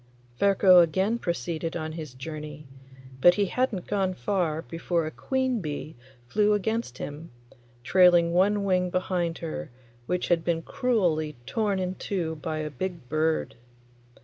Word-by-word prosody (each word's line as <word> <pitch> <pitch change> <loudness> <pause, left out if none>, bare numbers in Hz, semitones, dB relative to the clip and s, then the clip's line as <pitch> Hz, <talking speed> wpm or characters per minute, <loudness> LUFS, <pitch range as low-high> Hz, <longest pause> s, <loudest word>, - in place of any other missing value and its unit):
Ferko 195 -2 +6
again 190 +7 +1
proceeded 165 - -3
on 155 -1 -4
his 155 -5 -7
journey, 150 +1 -7 0.6
but 175 +4 +7
he 205 - +2
hadn't 220 -3 -1
gone 195 -2 0
far 175 -6 -1
before 165 0 -2
a 155 - -4
queen 260 +1 -1
bee 150 0 -5 0.3
flew 210 - +3
against 210 - -1
him, 150 +3 -7 0.5
trailing 175 +2 +5
one 200 +3 +3
wing 180 -2 +1
behind 175 -2 -1
her, 155 - -5 0.4
which 180 0 -1
had 170 -2 +3
been 165 -1 0
cruelly 170 -13 0
torn 205 - 0
in 185 -1 -2
two 175 -4 -3
by 155 +1 -4
a 155 -1 -3
big 170 -2 -5
bird. 155 +2 0
175 Hz, 145 wpm, -27 LUFS, 155-195 Hz, 0.6 s, but